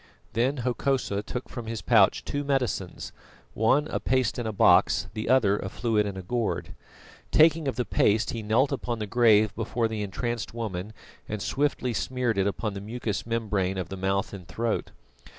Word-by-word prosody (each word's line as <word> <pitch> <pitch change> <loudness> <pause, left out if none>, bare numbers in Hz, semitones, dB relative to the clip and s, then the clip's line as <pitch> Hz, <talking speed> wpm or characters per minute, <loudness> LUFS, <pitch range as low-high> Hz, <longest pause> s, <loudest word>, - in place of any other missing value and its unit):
Then 125 +6 +1
Hokosa 125 -5 0
took 125 +4 -6
from 120 -3 -7
his 110 -4 -4
pouch 105 -5 +4
two 145 0 -2
medicines: 125 -10 -2 0.4
one 130 +7 +2
a - - -1
paste 130 -2 0
in 120 - -2
a - - -1
box, 100 - +4
the 110 - -4
other 110 -6 +4
a 95 - -4
fluid 110 -2 0
in 100 -1 -5
a 95 - -6
gourd. 115 +4 -2 0.6
Taking 160 -1 +4
of 135 - -1
the 125 0 -1
paste 105 0 +2
he 115 - -4
knelt 115 +7 +2
upon 125 -3 -2
the 110 - -3
grave 110 -2 +4
before 115 +1 -1
the 110 -1 -4
entranced 115 +3 -3
woman 105 -3 -4 0.4
and 105 - -3
swiftly 135 +2 -1
smeared 125 -2 -1
it 95 - +2
upon 105 +1 -2
the 100 - -6
mucous 110 0 -4
membrane 105 -5 -1
of 95 - -4
the 95 - -5
mouth 95 +1 -1
and 90 -3 -9
throat. 115 +2 -2
110 Hz, 185 wpm, -27 LUFS, 100-125 Hz, 0.6 s, pouch